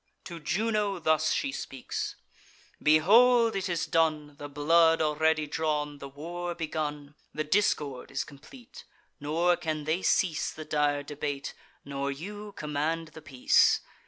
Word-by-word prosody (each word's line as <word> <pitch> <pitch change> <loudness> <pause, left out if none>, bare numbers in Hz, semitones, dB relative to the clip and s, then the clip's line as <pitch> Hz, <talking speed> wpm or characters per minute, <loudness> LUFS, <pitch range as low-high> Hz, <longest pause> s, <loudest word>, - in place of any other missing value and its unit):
To 170 -2 -8
Juno 205 +4 0
thus 155 -2 +2
she 275 - 0
speaks: 135 - -5 0.7
"Behold! 225 +10 +5
It 195 0 -2
is 170 -2 -1
done, 155 -2 +1
The 145 - -7
blood 160 +3 +4
already 155 0 +2
drawn, 150 -1 -2
the 140 - -8
war 175 +5 -5
begun; 150 -3 -4 0.2
The 155 - -1
discord 150 -6 0
is 135 - -2
complete; 235 - -14 0.4
nor 165 +4 +2
can 155 -3 -3
they 160 +5 -1
cease 175 -6 +1
The 155 - -9
dire 145 -1 +1
debate, 145 -1 -4 0.3
nor 140 0 -3
you 205 +8 -7
command 155 +2 -2
the 160 +1 -12
peace. 130 -4 +3
155 Hz, 135 wpm, -28 LUFS, 145-175 Hz, 0.7 s, Behold